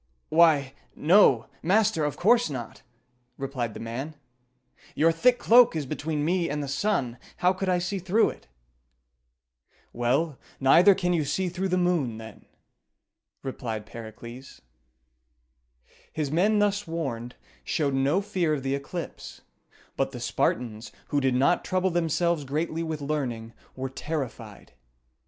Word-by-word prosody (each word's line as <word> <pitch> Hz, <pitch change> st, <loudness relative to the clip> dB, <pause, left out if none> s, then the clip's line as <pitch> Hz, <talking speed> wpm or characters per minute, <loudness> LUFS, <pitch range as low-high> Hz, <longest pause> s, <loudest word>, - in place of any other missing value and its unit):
"Why, 155 Hz, -5 st, +4 dB, 0.2 s
no! 150 Hz, -, +5 dB, 0.2 s
master, 200 Hz, -1 st, +2 dB
of 145 Hz, -, -3 dB
course 235 Hz, +5 st, +4 dB
not!" 120 Hz, -6 st, -7 dB, 0.6 s
replied 130 Hz, -5 st, -4 dB
the -, -, -7 dB
man. 130 Hz, +7 st, -5 dB, 0.8 s
"Your 165 Hz, +2 st, +4 dB
thick 245 Hz, +9 st, +3 dB
cloak 240 Hz, -4 st, +6 dB
is 155 Hz, -3 st, -2 dB
between 150 Hz, +2 st, -3 dB
me 175 Hz, +1 st, +1 dB
and 145 Hz, +1 st, -2 dB
the -, -, -5 dB
sun; 135 Hz, -, -1 dB, 0.2 s
how 180 Hz, +1 st, +3 dB
could 190 Hz, 0 st, -3 dB
I 180 Hz, -, +3 dB
see 180 Hz, +3 st, -2 dB
through 190 Hz, +5 st, +2 dB
it?" -, -, -16 dB, 1.5 s
"Well, 130 Hz, +5 st, 0 dB, 0.2 s
neither 170 Hz, +9 st, +6 dB
can 180 Hz, -2 st, 0 dB
you 165 Hz, -3 st, +1 dB
see 180 Hz, +6 st, -1 dB
through 185 Hz, +2 st, -2 dB
the 185 Hz, 0 st, 0 dB
moon, 170 Hz, -11 st, 0 dB
then," 110 Hz, -1 st, -12 dB, 1.0 s
replied 115 Hz, -5 st, -5 dB
Pericles. 115 Hz, +4 st, -11 dB, 1.5 s
His 150 Hz, -3 st, -3 dB
men, 200 Hz, +7 st, +3 dB
thus 205 Hz, -1 st, +1 dB
warned, 130 Hz, -8 st, -4 dB, 0.3 s
showed 145 Hz, -3 st, -1 dB
no 140 Hz, +8 st, +2 dB
fear 180 Hz, -6 st, 0 dB
of 135 Hz, -, -6 dB
the 135 Hz, 0 st, -1 dB
eclipse; 140 Hz, +5 st, -6 dB, 0.6 s
but -, -, -1 dB
the -, -, -6 dB
Spartans, 110 Hz, -2 st, -2 dB, 0.2 s
who 145 Hz, -, +1 dB
did 130 Hz, -2 st, +1 dB
not 140 Hz, +7 st, +2 dB
trouble 185 Hz, 0 st, 0 dB
themselves 170 Hz, -1 st, 0 dB
greatly 155 Hz, +4 st, -2 dB
with 160 Hz, -2 st, -4 dB
learning, 125 Hz, -6 st, -3 dB, 0.2 s
were 130 Hz, 0 st, -3 dB
terrified. 140 Hz, -1 st, -6 dB
155 Hz, 140 wpm, -26 LUFS, 130-180 Hz, 1.5 s, cloak